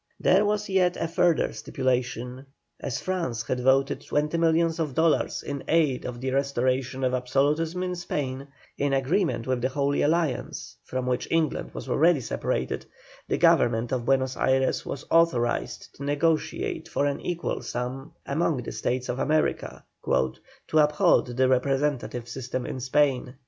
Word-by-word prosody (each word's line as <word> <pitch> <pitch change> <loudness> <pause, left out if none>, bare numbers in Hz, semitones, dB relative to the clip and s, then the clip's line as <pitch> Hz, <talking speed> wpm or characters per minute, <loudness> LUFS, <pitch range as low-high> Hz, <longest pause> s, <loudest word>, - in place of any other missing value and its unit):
There 195 +3 +4
was 210 0 0
yet 185 -2 +2
a - - -1
further 170 0 +2
stipulation. 125 0 -2 0.3
As 125 - -3
France 170 -12 -2
had 125 +1 -2
voted 135 +2 +2
20 150 +2 -1
millions 165 0 +2
of 150 -5 -2
dollars 160 -1 +1
in 140 -1 -5
aid 155 -6 +2
of 120 -1 -5
the 130 0 -2
restoration 130 -1 0
of 130 0 +1
absolutism 145 +7 0
in 180 0 -2
Spain, 140 -6 -4 0.3
in 140 0 +1
agreement 135 - +1
with 130 -2 -1
the 130 - +1
Holy 140 +1 0
Alliance, 160 -2 -1
from 130 0 -3
which 125 -1 -1
England 165 -3 0
was - - -6
already 165 0 +4
separated, 115 - -2 0.4
the - - 0
Government 115 +1 +3
of 125 -3 -1
Buenos 130 0 +1
Ayres 130 0 +1
was 140 - -5
authorized 130 -8 +1
to 140 - -7
negotiate 150 +3 0
for 145 - 0
an 140 -1 -1
equal 175 -1 -3
sum 125 +3 -5
among 140 -3 0
the - - -6
States 125 0 -2
of 125 - -3
America 155 +2 0 0.2
"to 65 0 0 0.4
uphold 150 +1 +4
the 130 0 +4
representative 130 -2 0
system 130 +1 -4
in 130 - -4
Spain." 130 0 +1
135 Hz, 155 wpm, -26 LUFS, 130-160 Hz, 0.4 s, There